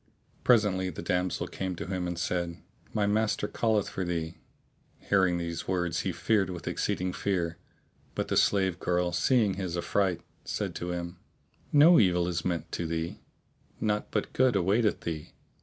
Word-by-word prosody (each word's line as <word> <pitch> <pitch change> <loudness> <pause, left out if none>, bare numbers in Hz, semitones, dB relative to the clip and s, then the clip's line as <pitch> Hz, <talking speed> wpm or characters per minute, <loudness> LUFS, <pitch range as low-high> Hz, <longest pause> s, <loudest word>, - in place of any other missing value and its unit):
Presently 105 -6 +3
the 80 - -7
damsel 90 +1 0
came 95 -1 -4
to - - -5
him 90 -1 -2
and 85 -1 -3
said, 85 -1 -1 0.3
"My 105 - +1
master 105 0 +1
calleth 110 -3 +1
for 95 - -3
thee." 85 -2 -3 0.6
Hearing 95 -3 +2
these 85 -1 -4
words 90 -2 0
he - - -1
feared 105 -4 +1
with 90 -2 -7
exceeding 90 0 -1
fear; 85 -4 -1 0.6
but - - -1
the - - -1
slave 95 -3 +3
girl, 90 0 +1
seeing 105 +4 +3
his 90 -2 -3
affright, 90 -1 0 0.2
said - - -3
to 90 - -4
him, 85 0 -4 0.5
"No 155 +4 +7
evil 90 -3 +3
is 85 -2 -2
meant 85 -2 -2
to 85 - -2
thee: 80 +1 -3 0.6
naught 105 -1 0
but - - -2
good 130 -2 +3
awaiteth 100 +4 +2
thee. 80 -2 -5
90 Hz, 160 wpm, -29 LUFS, 85-100 Hz, 0.6 s, No